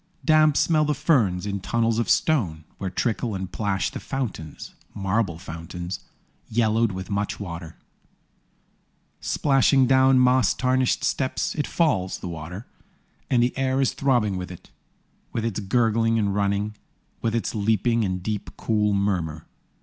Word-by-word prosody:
Damp 155 -2 +5
smell 155 -2 +3
the 150 0 0
ferns 120 - +2
in 100 -1 -2
tunnels 115 +3 0
of 120 - -1
stone, 95 - +1 0.2
Where 95 - -2
trickle 110 +2 -1
and 95 -1 -5
plash 100 -3 -1
the - - -6
fountains, 110 - -5 0.2
Marble 95 -3 0
fountains, 85 +2 -6 0.5
yellowed 110 0 +2
with 95 +2 -6
much 100 +1 -2
water. 85 -4 -7 1.4
Splashing 135 -1 +3
down 130 +1 +5
moss 125 -3 +4
tarnished 130 0 +1
steps 130 -2 0
It 150 - -2
falls, 95 - +1
the - - -7
water; 85 +6 -7 0.6
And 120 -2 +3
the 125 - 0
air 135 0 0
is 135 - +2
throbbing 120 -8 +1
with 90 0 -5
it. 90 - -12 0.6
With 115 - -1
its 110 -4 -2
gurgling 115 +2 +2
and 100 -3 +1
running. 100 +1 0 0.5
With 115 0 0
its 115 - -1
leaping, 110 +2 +1
and 95 -2 -2
deep, 105 0 -3
cool 105 -2 +1
murmur. 90 -6 -1
110 Hz, 145 wpm, -24 LUFS, 95-125 Hz, 1.4 s, Damp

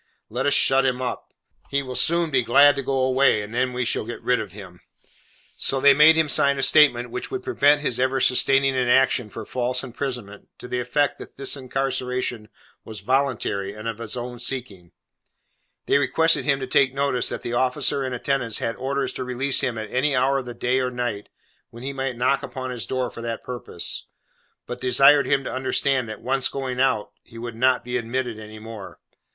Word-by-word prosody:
Let - - -2
us 145 - +3
shut 135 -1 +4
him 130 -1 0
up. 130 -1 -5 0.4
He 140 0 0
will 130 -1 -7
soon 170 +4 +2
be 130 -2 +3
glad 145 +5 +5
to 140 - -2
go 135 0 -2
away, 130 -4 +3
and 105 +2 -9
then 130 +1 0
we 125 0 -2
shall - - -1
get 120 +2 -8
rid 125 0 +2
of 105 - -6
him.' 95 -4 -12 0.8
So 135 - 0
they 140 +1 +7
made 155 +3 +7
him 160 -1 +2
sign 140 -1 +3
a 135 - -1
statement 125 -4 +4
which - - -5
would 390 -1 -5
prevent 150 - +3
his 130 -5 -1
ever 130 +1 +1
sustaining 135 +1 +2
an 125 -1 0
action 125 -2 +3
for 110 +1 -8
false 125 +1 -1
imprisonment, 125 -5 -6
to - - -10
the 125 0 -2
effect 140 +4 0
that - - -10
his 135 +1 0
incarceration 130 -4 -3 0.3
was 110 -3 -9
voluntary, 115 -5 -1
and 105 +1 -7
of 115 -1 -4
his 115 +1 -4
own 120 0 -6
seeking; 110 -10 -5 0.9
they - - +3
requested 160 +4 +2
him 140 -2 +2
to - - -2
take 130 +1 +2
notice 140 -3 0
that - - -5
the 120 - -4
officer 130 +3 0
in 130 - -3
attendance 125 -2 -1
had 115 - -2
orders 135 0 -2
to 130 - -4
release 130 +2 0
him 125 -4 -2
at 110 -1 -6
any 135 +2 +1
hour 135 +2 +2
of 130 - -7
the 120 - -7
day 125 +2 0
or 130 -1 0
night, 120 -5 -4 0.4
when 115 +1 -12
he 140 +1 -4
might 135 -2 -3
knock 130 +3 +1
upon 130 -1 -6
his 115 -7 -4
door 130 -2 -2
for - - -9
that 115 -1 -5
purpose; 120 -8 -4 0.6
but 125 0 -7
desired 135 +3 +5
him 135 - +1
to - - -5
understand, 130 -1 0
that 110 - -8
once 135 +1 +1
going 130 -2 -4
out, 110 -6 +1
he 115 - -15
would 120 0 -6
not 125 +2 +2
be 125 +1 -2
admitted 120 -1 -3
any 110 0 -10
more. 110 -5 -10
130 Hz, 210 wpm, -23 LUFS, 120-135 Hz, 0.9 s, they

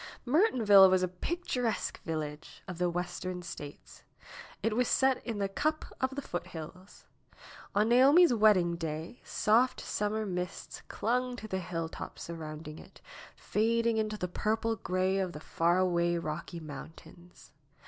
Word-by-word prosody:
Mertonville 240 - +6
was 185 0 +3
a - - +2
picturesque 245 - -3
village 155 -2 -6
of 180 -2 -7
the 180 0 +2
Western 180 +1 -4
States. 145 -4 -9 0.6
It 220 0 +1
was 250 0 +2
set 265 -1 +2
in 230 -3 -4
the 200 -1 0
cup 310 +10 -1 0.2
of 260 +1 0
the 285 - -4
foothills. 175 - -8 0.7
On 210 +2 +3
Naomi's 275 +6 +6
wedding 195 -6 +4
day 160 +6 -5
soft 235 +4 +2
summer 215 +1 -2
mists 180 -1 -5
clung 250 +2 -1
to 220 - -8
the 190 -3 -2
hilltops 165 -2 -5
surrounding 155 -2 -7
it, - - -15 0.4
fading 230 +1 +1
into 215 -1 -1
the 180 - -2
purple 220 +5 -1
gray 185 -1 0
of 185 -2 -2
the 150 - -7
far 170 +2 +1
away 175 -2 +2
Eocky 170 +1 -4
Mountains. 160 +4 -12
185 Hz, 140 wpm, -31 LUFS, 170-225 Hz, 0.7 s, Mertonville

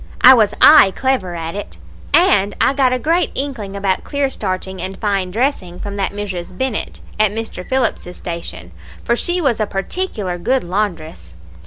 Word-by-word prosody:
I 260 - +10
was 220 -5 +3
aye 195 - +8
clever 260 -10 -1
at 165 0 -5
it, 205 - -7 0.3
and 205 - +3
I - - +3
got 265 -2 +2
a 255 - +1
great 330 +5 +1
inkling 245 -8 -3
about 195 -1 -1
clear 280 -2 -1
starching 190 -4 -4
and 190 +1 -5
fine 195 -3 -1
dressing 200 -5 -2
from 200 -1 -6
that 195 - -1
Mrs. 190 -3 -6
Bennett, 260 -4 -3 0.2
at 215 -1 +4
Mr. 220 -3 -5
Phillips's 235 -8 -1
station, 170 - -7 0.3
for 235 - +1
she 350 +8 0
was 270 -9 +1
a 215 - 0
particular 195 - -3
good 255 +8 0
laundress. 165 - -4
205 Hz, 170 wpm, -18 LUFS, 185-260 Hz, 0.3 s, I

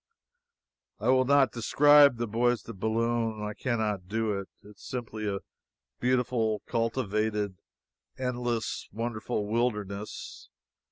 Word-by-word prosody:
I - - 0
will 130 0 +5
not 140 -3 +4
describe 145 +3 +6
the 120 - -1
Bois 120 +3 +2
de 110 - -10
Boulogne. 115 +1 -1
I 105 - -4
can 120 +2 -1
not 105 -4 -2
do 110 +1 0
it. 100 -1 -5
It - - -14
is - - -19
simply 110 -4 -5
a 100 -1 -2 0.6
beautiful, 120 -4 +1
cultivated, 110 -4 -1 0.6
endless, 120 -3 -2
wonderful 110 -1 -3
wilderness. 105 -2 -3
115 Hz, 120 wpm, -29 LUFS, 105-125 Hz, 0.6 s, describe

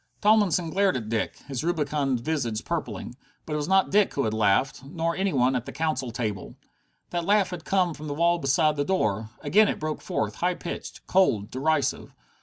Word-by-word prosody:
Tomlinson 200 -6 +3
glared 195 -6 +2
at 110 -3 -6
Dick, 115 -1 -1
his 135 -2 -4
rubicund 150 -6 0
visage 120 -7 -2
purpling. 170 -6 -4 0.3
But 155 - -5
it - - 0
was 150 - -2
not 190 +1 +3
Dick 205 0 +3
who 140 - +1
had 110 - -1
laughed. 110 +6 +1
Nor 165 +3 -2
any 195 0 0
one 130 -2 +2
at 125 -1 -3
the - - -5
council 155 -2 -2
table. 110 -5 -4 0.6
That 175 -1 -1
laugh 200 +1 +2
had 175 -2 -7
come 185 -3 +2
from 155 0 -8
the 145 - -3
wall 170 +2 +2
beside 150 +2 +2
the 145 - +1
door. 110 - 0
Again 215 +1 +4
it - - -2
broke 155 0 -3
forth, 110 0 -2
high 180 +1 0
pitched, 170 - -7
cold, 115 - +2
derisive. 145 +1 -1
155 Hz, 200 wpm, -26 LUFS, 125-175 Hz, 0.6 s, Again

